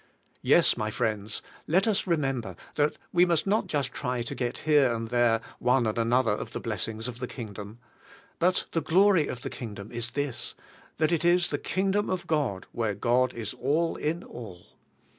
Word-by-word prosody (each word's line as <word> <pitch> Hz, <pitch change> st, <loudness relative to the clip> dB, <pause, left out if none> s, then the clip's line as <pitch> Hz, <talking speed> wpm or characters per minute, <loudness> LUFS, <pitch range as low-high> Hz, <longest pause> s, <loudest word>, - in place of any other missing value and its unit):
Yes, -, -, +5 dB
my 110 Hz, -, -1 dB
friends, 110 Hz, -2 st, -2 dB, 0.2 s
let 185 Hz, +7 st, +3 dB
us 205 Hz, -3 st, +1 dB
remember 135 Hz, -8 st, 0 dB, 0.2 s
that 150 Hz, 0 st, +1 dB, 0.2 s
we 175 Hz, 0 st, +6 dB
must 170 Hz, -3 st, +2 dB
not 205 Hz, 0 st, +1 dB
just 140 Hz, -5 st, -1 dB
try 125 Hz, -3 st, -2 dB
to 115 Hz, -, -4 dB
get 120 Hz, -1 st, -2 dB
here 145 Hz, -5 st, +5 dB
and 115 Hz, -1 st, -3 dB
there 120 Hz, -2 st, +3 dB, 0.2 s
one 125 Hz, 0 st, +3 dB
and 110 Hz, -, 0 dB
another 115 Hz, 0 st, +2 dB
of 105 Hz, -, -3 dB
the -, -, -3 dB
blessings 110 Hz, +1 st, -3 dB
of 120 Hz, -1 st, -6 dB
the 125 Hz, -, -3 dB
Kingdom. 105 Hz, -3 st, -8 dB, 0.6 s
But 180 Hz, +2 st, +2 dB
the 165 Hz, -, 0 dB
glory 180 Hz, +1 st, +4 dB
of 125 Hz, -, -6 dB
the -, -, -4 dB
Kingdom 105 Hz, -3 st, -7 dB
is 120 Hz, 0 st, -3 dB
this: 145 Hz, -3 st, -2 dB, 0.4 s
that 155 Hz, +1 st, +2 dB
it 170 Hz, -2 st, +1 dB
is 175 Hz, 0 st, +4 dB
the 145 Hz, -, -1 dB
Kingdom 195 Hz, +2 st, 0 dB
of 185 Hz, -1 st, -2 dB
God 135 Hz, -, 0 dB
where 110 Hz, -3 st, -1 dB
God 125 Hz, +4 st, +2 dB
is 115 Hz, -2 st, -4 dB
all 145 Hz, +7 st, 0 dB
in 165 Hz, +4 st, -2 dB
all. 100 Hz, -8 st, -10 dB
125 Hz, 185 wpm, -28 LUFS, 115-165 Hz, 0.6 s, we